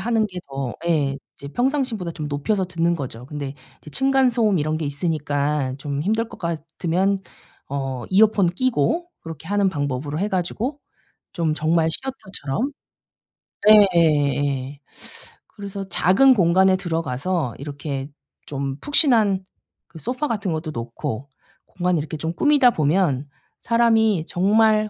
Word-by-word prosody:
하는 225 0 +1
게 185 -3 -8
더 135 -3 -4
예 145 -5 +1 0.2
이제 140 - -9
평상시보다 245 - -1
좀 150 -3 -5
높여서 185 +8 0
듣는 170 -1 0
거죠. 125 -4 -6
근데 145 -1 -5 0.2
이제 150 - -13
층간 270 - +3
소음 220 -6 +2
이런 155 +1 0
게 160 - -3
있으니까 145 -2 -1
좀 140 0 -3
힘들 220 +5 0
것 - - -12
같으면 170 +4 -1 0.5
어 135 -3 -3
이어폰 200 -2 +4
끼고 255 - 0
그렇게 160 0 -9
하는 205 -1 +2
방법으로 145 -2 -3
해 205 +4 0
가지고 215 - -2 0.5
좀 160 -3 0
정말 160 +1 +2
시어터처럼 240 - -4 1.0
예예예. 145 -8 +4 0.7
그래서 200 -2 -7
작은 230 +10 +5
공간에 190 0 +4
들어가서 165 -4 -2
이렇게 140 -1 -5 0.4
좀 140 -1 -4
푹신한 225 - +3 0.4
그 160 - -12
소파 250 - -2
같은 205 -7 -2
것도 155 0 -3
놓고 115 +1 -5 0.4
공간을 180 -2 0
이렇게 155 +1 -4
좀 160 +3 -3
꾸미다 285 - +4
보면 150 - +1 0.3
사람이 225 -6 +3
정말 215 +3 +3
170 Hz, 280 characters per minute, -22 LUFS, 145-215 Hz, 1.0 s, 작은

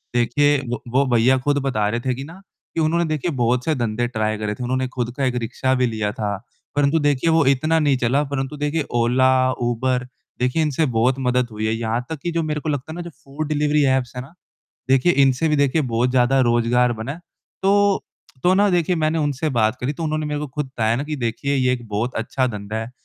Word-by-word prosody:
देखिए 140 +5 +3
वो 120 - -3
वो 135 +2 +4
भैया 125 +3 +4
खुद 145 +2 0
बता 110 -6 0
रहे 115 +2 -1
थे 130 +1 -1
कि 135 - -6
ना 160 +4 -10 0.4
कि - - 0
उन्होंने 170 +2 +2
देखिए 155 +2 -2
बहुत 125 -1 0
से 160 - +1
धंधे 120 -1 -1
ट्राई 110 -2 -1
करे 105 0 -2
थे। 125 - -6
उन्होंने 130 +1 -1
खुद 125 -1 -3
का 135 - +1
एक 125 -1 0
रिक्शा 130 +3 -1
भी 125 -1 +2
लिया 110 -3 -2
था, 105 -2 -3 0.4
परंतु 145 +2 +3
देखिए 145 +2 +1
वो 160 -2 +3
इतना 155 +5 +2
नहीं 145 -3 +2
चला, 125 +4 +1
परंतु 140 0 -4
देखिए 150 +1 -1 0.2
ओला 125 +2 +3 0.2
यूबर 125 +1 -1 0.3
देखिए 125 +6 +1
इनसे 155 0 +1
बहुत 125 +1 +2
मदद 125 -1 +1
हुई 110 0 -3
है। 110 - +1
यहाँ 115 +1 -2
तक 160 -2 -5
कि 175 - -1
जो 165 0 0
मेरे 150 -1 -2
को 155 - -3
लगता 145 +1 -3
है - - -7
ना 175 - -5
जो 170 - -7
फूड 145 +3 -5
डिलीवरी 150 0 +2
ऐप्स 125 -1 -4
है 125 - -4
ना? 135 +6 -13 0.6
देखिए 135 +6 +4
इनसे 135 +4 +2
भी 150 - +2
देखिए 145 +2 +2
बहुत 120 -1 0
ज़्यादा 130 +1 +3
रोज़गार 120 0 +2
बना 115 +4 -5
है। 160 - -9 0.4
तो 200 0 +3 0.4
तो 180 - +4
ना 205 +2 +4
देखिए 175 0 +1
मैंने 155 0 +1
उनसे 145 0 -1
बात 110 0 +2
करी 125 +4 -1
तो 160 - -7
उन्होंने 155 0 -1
मेरे 150 0 -2
को 150 - -3
खुद 150 +2 -4
बताया 115 -4 0
ना 135 - -2
कि 150 0 -4
देखिए 125 +3 -2
ये 130 -2 +2
एक 120 -2 -4
बहुत 110 +5 -2
अच्छा 130 +3 -1
धंधा 105 -2 -5
है 110 +1 -4
130 Hz, 235 wpm, -21 LUFS, 120-150 Hz, 0.6 s, वो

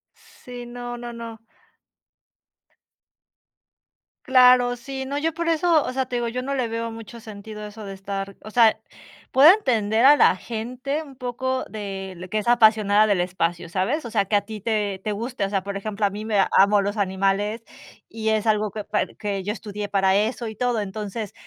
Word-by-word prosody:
Sí, 245 -1 -11
no, 240 0 -7
no, 240 0 -7
no. 230 -1 -8 2.9
Claro, 250 -1 +5
sí, 265 +2 -6
no, 280 +2 -3
yo 315 +2 -1
por 335 0 -2
eso, 330 -1 +3
o - - -3
sea, 260 0 -1
te 250 - -5
digo, 240 -1 -1
yo 250 +2 -3
no 275 +2 -3
le 250 -4 -1
veo 230 0 -3
mucho 225 +1 -10
sentido 215 -1 -9
a 210 - -6
eso 215 +1 -10
de 195 - -7
estar 195 0 -6
o 215 - -10
sea, 225 -1 +4 0.5
puedo 290 +7 +8
entender 230 - +1
a 290 +2 +9
la 190 - +4
gente 250 +8 -4
un 275 -4 -14
poco 260 +1 -2
de 195 -4 -7
que 215 - 0
es 215 - -3
apasionada 215 -3 +5
del 205 -4 +1
espacio, 175 -1 -1
¿sabes? 195 - -1
O 235 - -6
sea, 215 -3 +2
que 205 +1 +1
a - - +1
ti 215 -2 -8
te 205 -3 -1
te 215 - -2
guste. 230 +3 -4
O 195 - 0
sea, 195 -2 0
por 200 0 -5
ejemplo, 205 +1 -2
a 200 - +2
mí 210 +2 -7
me 215 -2 -1 0.2
amo 200 +2 +5
los 205 +2 -2
animales, 195 +3 0 0.4
y 220 -1 -3
es 220 0 0
algo 215 -1 +1
que 210 -1 -6
par 210 - -2
que 200 -2 -3
yo 205 - -2
estudié 210 -1 -6
para 195 -1 +2
eso 225 +3 0
y 220 - -7
todo. 245 0 0
Entonces, 210 +1 -5
220 Hz, 200 wpm, -23 LUFS, 200-245 Hz, 2.9 s, a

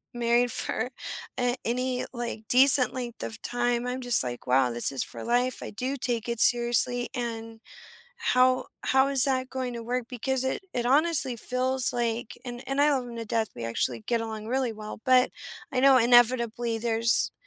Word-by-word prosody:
married 240 0 +1
for 225 +2 -1 0.5
a 245 0 0
any, 250 +2 -2
like, 235 -2 -5
decent 265 0 +6
length 245 -2 -6
of 225 - -7
time, 245 0 -1
I'm 250 +1 -3
just 245 -2 +5
like, 120 -1 -6
"Wow, 130 0 +3
this 120 +3 +2
is 135 -2 -3
for - - -9
life, 245 +2 0
I - - -7
do 255 +6 -4
take 240 -2 -3
it 235 -1 -3
seriously, 240 0 +3
and 225 -2 -6 0.6
how 255 - +2 0.2
how 265 +1 +3
is 270 -2 +4
that 260 -2 -1
going 255 -1 -4
to 235 - -7
work?" 245 +1 -3
Because 260 +1 -1
it 265 - -3
it 240 -1 -2
honestly 280 -2 +2
feels 255 +2 0
like 235 -1 -3
and 245 0 -7
and 275 +1 0
I 295 +1 +4
love 260 -3 -1
him 235 - -9
to 230 - -4
death, 220 0 -1
we 115 - -7
actually 115 +1 -2
get 235 - 0
along 220 -1 -6
really 255 -2 -1
well, 215 0 -9
but 255 0 +4 0.4
I 255 - -1
know 270 0 +6
inevitably 235 -1 +3
there's, 230 0 +4
245 Hz, 185 wpm, -26 LUFS, 230-255 Hz, 0.6 s, decent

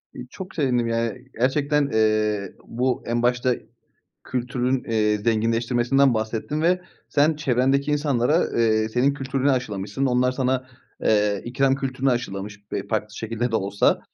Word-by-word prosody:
İii, 125 - -8
çok 185 +6 -9
sevindim, 125 -6 +1
yani, 115 +2 -2
gerçekten, 140 +3 +2
eee, 110 -2 +1
bu 125 +2 -1
en 120 0 0
başta 125 +1 +2 0.7
kültürün, 125 +1 -1
eee, 105 -2 +1
zenginleştirmesinden 120 +4 +2
bahsettin 110 +7 -2
ve 180 +2 +3 0.3
sen 150 +1 +3
çevrendeki 135 +1 +1
insanlara, 145 0 +2
eee, 110 -1 +2
senin 125 +5 +2
kültürünü 135 0 0
aşılamışsın. 105 -1 -1
Onlar 125 0 +2
sana, 130 0 -1 0.4
eee, 105 -2 +2
ikram 135 +2 +2
kültürünü 135 0 -1
aşılamış 105 -3 -4
be - - -3
farklı 105 -1 -2
şekilde 115 +2 -2
de - - +3
olsa. 100 0 +1
125 Hz, 135 wpm, -23 LUFS, 110-135 Hz, 0.7 s, ve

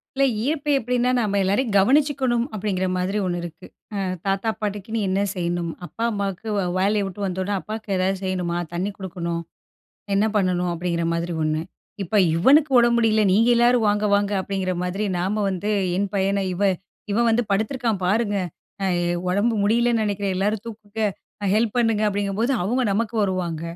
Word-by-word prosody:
இல்ல 275 - +2 0.2
ஈர்ப்பு 295 0 0
எப்படின்னா? 250 0 0
நம்ம 200 -2 0
எல்லாரையும் 205 +4 +1
கவனிச்சுக்கணும் 260 +1 +3
அப்டிங்கிற 190 -2 -1
மாரி 185 +3 -1
ஒண்ணு 175 -1 -1
இருக்கு. 165 -2 -9 0.3
அ - - -2 0.3
தாத்தா, 195 +3 0
பாட்டிக்குன்னு 210 +2 -3
என்ன 190 +1 +1
செய்யணும்? 175 -1 -2
அப்பா 200 +8 -6
அம்மாக்கு, 200 0 -3
வே 200 - +1 0.2
வேலைய 205 +2 +2
வுட்டு 195 +2 -8
வந்த 190 0 -2
உடனே, 200 +2 -1
அப்பாக்கு 215 0 -7
எதாவது 190 +1 +1
செய்யணுமா, 180 -2 -1 0.2
தண்ணி 185 +4 -1
கொடுக்கணும். 170 -3 -4 0.7
என்ன 200 +2 +3
பண்ணணும்? 180 -3 +1
அப்டிங்கிற 170 0 -2
மாரி 170 +1 -2
ஒண்ணு. 155 0 0 0.4
இப்ப 195 +3 -6 0.2
இவனுக்கு 280 - +5
உடம்பு 235 0 +4
முடியல, 220 -2 +3
நீங்க 225 +5 +4
எல்லாரும் 240 0 +4
வாங்க! 205 +1 +1
வாங்க! 200 0 +1
அப்டிங்கற 190 -1 -2
மாதிரி, 190 +4 -2
நாம 200 +4 0
வந்து 190 +3 -2 0.3
என் 200 0 0
பையன, 195 0 +1
"இவ 185 - -3 0.5
இவன் 235 +3 +3
வந்து 230 +2 +3
படுத்துருக்கான் 220 0 0
பாருங்க, 205 +1 +1 0.5
அ - - +1 0.4
உடம்பு 205 +6 +2
முடியலன்னு 230 +2 +2
நினைக்கிறேன், 200 -2 -1
எல்லாரும் 205 +3 -1
தூக்குங்க, 215 -1 -8 0.5
ஹெல்ப் 220 +1 +1
பண்ணுங்க" 225 -3 +2
அப்படிங்கும்போது 205 +4 0
அவங்க 245 +7 +1
நமக்கு 225 +2 -1
வருவாங்க. 180 -5 -2
200 Hz, 160 wpm, -23 LUFS, 185-225 Hz, 0.7 s, இவனுக்கு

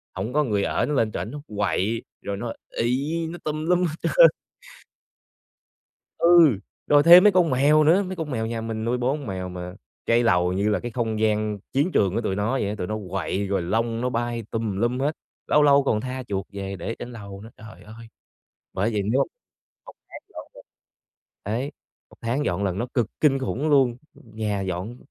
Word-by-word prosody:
hổng 100 +6 -4
có 150 +1 +3
người 105 -6 0
ở - - 0
nó 150 - -2
lên 115 -5 +1
trển 105 +2 -5
nó 150 - -7 0.2
quậy 105 +2 0 0.2
rồi 100 -1 -4
nó 115 +1 -4 0.2
ị, 145 +8 -1
nó 175 - -7
tùm 155 +1 -3
lum 180 +1 +2
hết 155 -2 -3
trơn. - - +6 1.9
Ừ! 170 - +6 0.3
Rồi 145 0 +5
thêm 175 +2 +9
mấy 210 - +7
con 175 -3 +3
mèo 145 +4 +4
nữa, 175 +6 +4
mấy 185 0 -5
con 160 -4 -5
mèo 110 -3 -2
nhà 115 0 -3
mình 110 -1 -4
nuôi 120 +2 0
4 130 +4 0
con 140 -6 -8
mèo 95 -1 -4
mà 90 0 -7 0.3
cái 115 +1 +3
lầu 90 -5 +2
như 100 +3 0
là 105 - +1
cái 120 - -6
không 110 -2 -2
gian 105 -1 0
chiến 145 +7 +1
trường 100 - +2
của 115 - 0
tụi 95 -3 -2
nó 105 +3 -1
vậy 130 -7 -1
á, 105 - -3
tụi 90 - -4
nó 110 - -3
quậy 95 +2 -2
rồi 100 -1 0
lông 115 +6 -1
nó 125 - 0
bay 120 -1 -2
tùm 110 -4 -2
lum 120 +4 0
hết, 150 +3 0 0.3
lâu 150 - +4
lâu 140 -1 +5
còn 110 -6 0
tha 130 +1 -5
chuột 100 -2 -3
về 100 -1 -5
để 95 +6 -5
trên 120 - -7
lầu 100 -4 -9
nữa. 110 - -11
Trời 110 0 -13
ơi! 110 +2 -12 0.7
Bởi 105 +5 0
vậy 105 -2 0
nếu 115 +7 +1 0.7
1 - - -11 0.2
tháng - - -10
dọn - - -8
lần - - -14 0.8
đấy, 120 +8 -3 0.4
1 - - -18
tháng 125 +6 -1
dọn 90 +3 -1
lần 95 -1 -1
nó 120 - -2
cực 120 -4 +2
kinh 140 -3 +3
khủng 135 +3 -2
luôn, 130 -4 +3 0.2
nhà 110 -3 -4
dọn, 95 +5 -4
115 Hz, 215 wpm, -24 LUFS, 105-140 Hz, 1.9 s, thêm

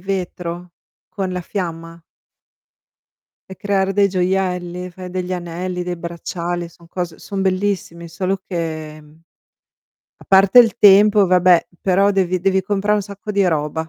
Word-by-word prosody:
vetro, 180 -2 -5 0.4
con 190 -3 -4
la 180 - -3
fiamma? 170 -3 -6 1.5
e 190 - -8
creare 195 -1 0
dei 200 -1 +3
gioielli? 180 -1 -2
Fai 185 +1 -9
degli 180 0 -4
anelli, 180 +1 -4
dei 180 0 -4
bracciali, 170 0 -5
son 170 0 -20
cose 175 -1 -5
son 200 -1 -5
bellissimi 185 -3 -2
solo 185 +3 -3
che, 155 -3 -5
mhmm, 150 +1 -20 1.0
a - - -17
parte 195 +4 +6
il 225 -5 +6
tempo, 205 +1 +6
vabbè, 180 -1 +4
però 195 +1 +3
devi 185 -2 0
devi 190 +1 +1
comprare 205 +2 0
un 205 - -1
sacco 200 +1 -8
di 200 -2 +2
roba. 160 -1 -2
180 Hz, 145 wpm, -19 LUFS, 170-195 Hz, 1.5 s, parte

